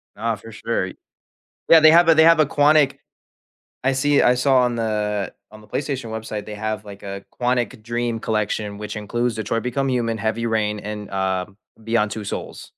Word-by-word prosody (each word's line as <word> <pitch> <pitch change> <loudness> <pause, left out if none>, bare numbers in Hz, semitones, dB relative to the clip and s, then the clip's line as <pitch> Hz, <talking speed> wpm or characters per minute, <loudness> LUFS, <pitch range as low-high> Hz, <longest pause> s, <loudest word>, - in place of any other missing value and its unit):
Uh, 115 +1 -1
for 115 +2 -13
sure. 110 -4 -2 0.8
Yeah, 165 - +9
they 155 0 +7
have 165 -1 +6
they 160 - +6
have 165 -1 +6
a 155 - +6
Quantic 145 -1 +3 0.9
I 135 +1 +2
see 145 +2 +3
I 125 - +5
saw 130 +1 +3
on 125 -1 +2
the 105 -3 -2 0.2
on 110 0 -13
the 105 - -18
PlayStation 135 -5 -3
website, 110 -1 -5
they 105 -1 -8
have, 110 -1 -3
like, 100 -1 -11
a 100 0 -6 0.2
Quantic 125 -1 0
Dream 120 0 -2
collection, 105 -1 -2
which 105 0 -6
includes 115 +2 -2
Detroit: 110 +1 -2
Become 135 +2 -1
Human, 115 -3 -1
Heavy 110 +2 -2
Rain 105 -2 0
and, 105 0 -6
uh, 95 -1 -1 0.4
Beyond: 115 -2 +1
Two 105 -1 -5
Souls. - - -6
115 Hz, 185 wpm, -22 LUFS, 105-125 Hz, 0.9 s, Yeah